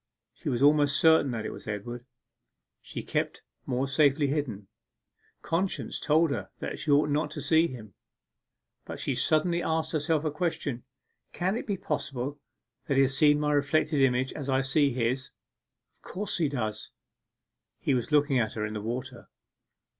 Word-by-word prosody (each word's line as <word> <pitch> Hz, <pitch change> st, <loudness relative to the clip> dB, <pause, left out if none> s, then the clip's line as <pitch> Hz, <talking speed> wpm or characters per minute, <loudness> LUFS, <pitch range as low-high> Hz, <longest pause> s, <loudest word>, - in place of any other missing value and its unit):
She -, -, -5 dB
was 125 Hz, +1 st, 0 dB
almost 145 Hz, -1 st, +4 dB
certain 160 Hz, -3 st, +5 dB
that 115 Hz, -3 st, -3 dB
it -, -, -3 dB
was -, -, -11 dB
Edward. 120 Hz, +4 st, -5 dB, 0.7 s
She -, -, -7 dB
kept -, -, -2 dB, 0.2 s
more 130 Hz, +1 st, 0 dB
safely 145 Hz, +1 st, +3 dB
hidden. 135 Hz, -9 st, -2 dB, 0.8 s
Conscience 185 Hz, +4 st, -1 dB
told 160 Hz, +1 st, +3 dB
her -, -, -3 dB
that -, -, -5 dB
she 155 Hz, -, -4 dB
ought 145 Hz, +1 st, +4 dB
not 150 Hz, +1 st, 0 dB
to -, -, -6 dB
see 160 Hz, +1 st, +3 dB
him. 110 Hz, -, -10 dB, 0.9 s
But -, -, -8 dB
she 140 Hz, -, -1 dB
suddenly 160 Hz, +7 st, +2 dB
asked 160 Hz, -1 st, -1 dB
herself 155 Hz, 0 st, 0 dB
a 155 Hz, -, 0 dB
question: 145 Hz, -6 st, -2 dB, 0.5 s
'Can 185 Hz, +3 st, 0 dB
it -, -, -4 dB
be 200 Hz, -2 st, -1 dB
possible 140 Hz, -3 st, -3 dB, 0.5 s
that 140 Hz, -, +1 dB
he 135 Hz, -, +6 dB
sees 145 Hz, +3 st, +4 dB
my 150 Hz, 0 st, +1 dB
reflected 145 Hz, 0 st, +2 dB
image, 130 Hz, 0 st, +2 dB
as 140 Hz, -2 st, -6 dB
I 130 Hz, 0 st, +3 dB
see 140 Hz, +2 st, +2 dB
his? 130 Hz, +1 st, -1 dB, 0.6 s
Of -, -, -24 dB
course 195 Hz, 0 st, -3 dB
he 155 Hz, -4 st, +2 dB
does!' 110 Hz, -6 st, -3 dB, 0.9 s
He -, -, 0 dB
was 125 Hz, +2 st, -1 dB
looking 145 Hz, -3 st, +3 dB
at 110 Hz, -2 st, -1 dB
her 105 Hz, -1 st, -2 dB
in 110 Hz, -, -5 dB
the 105 Hz, -, -4 dB
water. 120 Hz, +2 st, -5 dB
140 Hz, 170 wpm, -28 LUFS, 125-155 Hz, 0.9 s, he